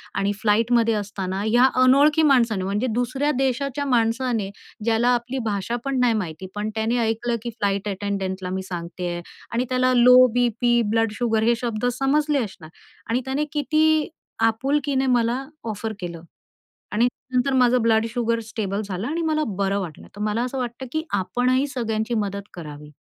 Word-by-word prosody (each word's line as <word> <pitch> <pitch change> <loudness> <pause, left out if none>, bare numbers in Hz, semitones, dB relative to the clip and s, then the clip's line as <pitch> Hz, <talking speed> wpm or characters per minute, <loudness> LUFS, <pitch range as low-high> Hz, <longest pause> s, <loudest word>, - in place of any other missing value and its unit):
आणि 200 +1 +1
फ्लाईटमध्ये 230 +1 +3
असताना 195 -2 -3
ह्या 240 +3 +4 0.2
अनोळखी 290 +5 +5
माणसाने, 235 -9 +3
म्हणजे 205 +6 -1
दुसऱ्या 255 +5 0
देशाच्या 270 +2 -1
माणसाने, 230 -3 +1 0.3
ज्याला 230 +2 +2
आपली 245 +3 -3
भाषा 200 +3 -2
पण 275 -1 0
नाही 245 -2 +3
माहिती. 160 +3 -8
पण 210 +1 -2
त्याने 225 +2 0
ऐकलं, 230 +2 -1
की 240 - -3
फ्लाइट 200 0 0
अटेंडंटला 190 -2 -3
मी 190 +1 -3
सांगतेय 175 0 -4 0.3
आणि 240 +2 0
त्याला 255 0 +2
लो 250 +1 +7 0.2
बीपी, 240 0 +2
ब्लड 225 -1 +2
शुगर 225 -2 +1
हे 235 +1 +3
शब्द 235 -2 -2
समजले 290 +2 +2
असणार 175 -6 -9 0.4
आणि 245 +3 +1
त्याने 275 +3 -1
किती 310 +1 +2 0.3
आपुलकीने 265 +4 +1
मला 245 +1 +1 0.2
ऑफर 220 +1 -4
केलं 170 -2 -6 0.7
आणि 230 +3 +3 0.3
नंतर 255 +2 +2
माझं 250 -1 +4
ब्लड 225 -1 +3
शुगर 230 -1 0
स्टेबल 205 -2 -3
झालं 195 +2 -4
आणि 325 +4 -2
मला 310 -1 +1
बरं 200 0 0
वाटलं. 170 -6 -7
तर 205 - -7
मला 215 +3 0
असं 255 +2 -4
वाटतं, 245 +1 -4
की 315 +2 -1 0.2
आपणही 255 +7 +1
सगळ्यांची 230 -4 -2
मदत 200 0 -6
करावी. 150 -3 -9
230 Hz, 160 wpm, -23 LUFS, 205-255 Hz, 0.7 s, लो